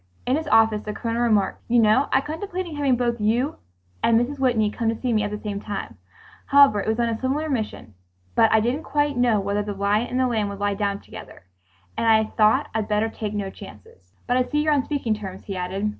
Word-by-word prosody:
In 255 Hz, -, +2 dB
his 315 Hz, 0 st, -3 dB
office 220 Hz, -5 st, +4 dB
the 210 Hz, 0 st, -6 dB
Colonel 230 Hz, +1 st, -2 dB
remarked, 215 Hz, -5 st, +1 dB
"You 240 Hz, -, +2 dB
know, 225 Hz, +4 st, +4 dB
I 265 Hz, -, +3 dB
contemplated 345 Hz, +2 st, -5 dB
having 280 Hz, -3 st, +2 dB
both 235 Hz, -2 st, -1 dB
you 235 Hz, +7 st, 0 dB, 0.4 s
and 230 Hz, -1 st, +4 dB
Mrs. 270 Hz, +4 st, -3 dB
Whitney 230 Hz, -5 st, +2 dB
come 230 Hz, 0 st, -1 dB
to 225 Hz, -, -1 dB
see 250 Hz, -2 st, -1 dB
me 215 Hz, -, +2 dB
at 205 Hz, -, -1 dB
the 210 Hz, -, -4 dB
same 205 Hz, -1 st, -5 dB
time, 205 Hz, -2 st, -6 dB, 0.5 s
since 280 Hz, -5 st, +6 dB
it 205 Hz, -, -2 dB
was 220 Hz, +1 st, 0 dB
on 235 Hz, -1 st, +1 dB
a 225 Hz, -1 st, -3 dB
similar 280 Hz, +4 st, -1 dB
mission, 215 Hz, -, -4 dB, 0.4 s
but 225 Hz, -, +4 dB
I 220 Hz, -, +4 dB
didn't 245 Hz, +7 st, -1 dB
quite 290 Hz, -2 st, 0 dB
know 240 Hz, -3 st, +2 dB
whether 200 Hz, +1 st, -1 dB
the 205 Hz, -1 st, -5 dB
lion 205 Hz, +4 st, +1 dB
and 250 Hz, -, -2 dB
the 260 Hz, -, +3 dB
lamb 220 Hz, -4 st, 0 dB
would 200 Hz, -, -6 dB
lie 205 Hz, 0 st, 0 dB
down 200 Hz, 0 st, -2 dB
together, -, -, -12 dB, 0.5 s
and 230 Hz, -, -1 dB
I 220 Hz, -1 st, +5 dB
thought 215 Hz, -1 st, +3 dB
I'd 220 Hz, -1 st, -1 dB
better 215 Hz, +1 st, +1 dB
take 215 Hz, -1 st, -5 dB
no 200 Hz, -2 st, -3 dB
chances.... 100 Hz, -, -15 dB
But 245 Hz, -, +1 dB
I 255 Hz, -, +3 dB
see 295 Hz, +3 st, 0 dB
you're 305 Hz, -1 st, +2 dB
on 280 Hz, -3 st, +1 dB
speaking 275 Hz, -7 st, -1 dB
terms," 195 Hz, -3 st, -7 dB
he 195 Hz, -, -5 dB
added. 185 Hz, +3 st, -2 dB
225 Hz, 235 wpm, -23 LUFS, 210-255 Hz, 0.5 s, since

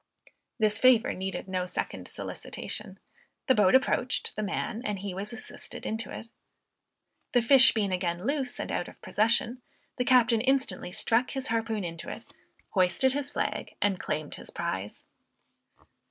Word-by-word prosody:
This 215 Hz, -2 st, +2 dB
favor 250 Hz, -2 st, +5 dB
needed 190 Hz, +1 st, -4 dB
no 185 Hz, -1 st, -2 dB
second -, -, -4 dB
solicitation; -, -, -6 dB, 0.5 s
the 260 Hz, -, +5 dB
boat 210 Hz, -1 st, +5 dB
approached 255 Hz, -1 st, +1 dB
the 215 Hz, -, -2 dB
man 215 Hz, +2 st, -2 dB
and 210 Hz, -5 st, -2 dB
he 195 Hz, 0 st, -5 dB
was 200 Hz, +3 st, -5 dB
assisted 245 Hz, +1 st, -8 dB
into 220 Hz, +1 st, -3 dB
it. 230 Hz, -, -8 dB, 1.0 s
The 245 Hz, -, +5 dB
fish 255 Hz, +1 st, +8 dB
being 205 Hz, -3 st, +1 dB
again 180 Hz, 0 st, -1 dB
loose 275 Hz, -2 st, -1 dB
and -, -, -3 dB
out -, -, -1 dB
of -, -, -13 dB
possession, 235 Hz, +3 st, +1 dB, 0.4 s
the 250 Hz, -, +1 dB
captain 240 Hz, -3 st, +4 dB
instantly 265 Hz, -6 st, 0 dB
struck 230 Hz, +6 st, +2 dB
his 270 Hz, -2 st, -4 dB
harpoon 225 Hz, -2 st, -1 dB
into 165 Hz, -1 st, -5 dB
it, -, -, -7 dB, 0.5 s
hoisted 195 Hz, +8 st, +3 dB
his 285 Hz, 0 st, -1 dB
flag, -, -, -3 dB
and 200 Hz, -2 st, +1 dB
claimed 150 Hz, -1 st, -3 dB
his -, -, -8 dB
prize! 105 Hz, -, -4 dB
225 Hz, 155 wpm, -29 LUFS, 190-250 Hz, 1.0 s, fish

